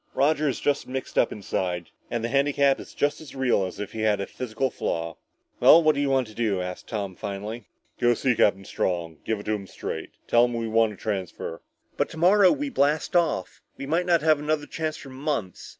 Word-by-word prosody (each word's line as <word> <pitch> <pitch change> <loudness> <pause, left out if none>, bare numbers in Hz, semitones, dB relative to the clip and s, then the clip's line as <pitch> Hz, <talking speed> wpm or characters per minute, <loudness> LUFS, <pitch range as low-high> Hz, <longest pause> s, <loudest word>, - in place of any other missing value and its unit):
Roger 150 +2 +2
is 130 - -3
just 145 0 0
mixed 130 +1 -5
up - - +3
inside. 90 -4 -3 0.2
And 120 -1 -2
the - - 0
handicap 140 0 +3
is - - -11
just 145 +2 0
as 150 -3 -11
real 130 -6 +2
as 90 - -9
if 105 - -5
he 110 - -5
had 105 -2 +2
a 100 - -2
physical 125 +3 -3
flaw. 85 -5 -3 0.4
"Well, 165 - +8
what 155 0 +5
do 140 - -1
you 140 - +1
want 135 -1 +2
to 110 - -13
do?" 105 -4 0
asked 90 0 -5
Tom 100 -4 -4
finally. 105 +3 -6 0.3
"Go 120 0 +4
see 130 +2 +2
Captain 100 -3 +2
Strong. 85 -4 -2
Give 110 -2 -1
it - - -8
to 110 - 0
him 100 -2 -4
straight. - - -5 0.2
Tell 120 +1 +5
him 120 -1 -3
we 115 -1 -2
want 110 0 +3
a - - -11
transfer." 95 -5 -4 0.4
"But - - +1
tomorrow 185 +4 +5
we 290 -1 -2
blast 150 - +1
off. 170 - +1 0.2
We - - -5
might 165 +5 0
not 170 -3 +3
have 155 -2 +4
another 150 0 -1
chance 155 0 -3
for 135 - -11
months! 130 - -3
120 Hz, 220 wpm, -25 LUFS, 100-145 Hz, 0.4 s, Well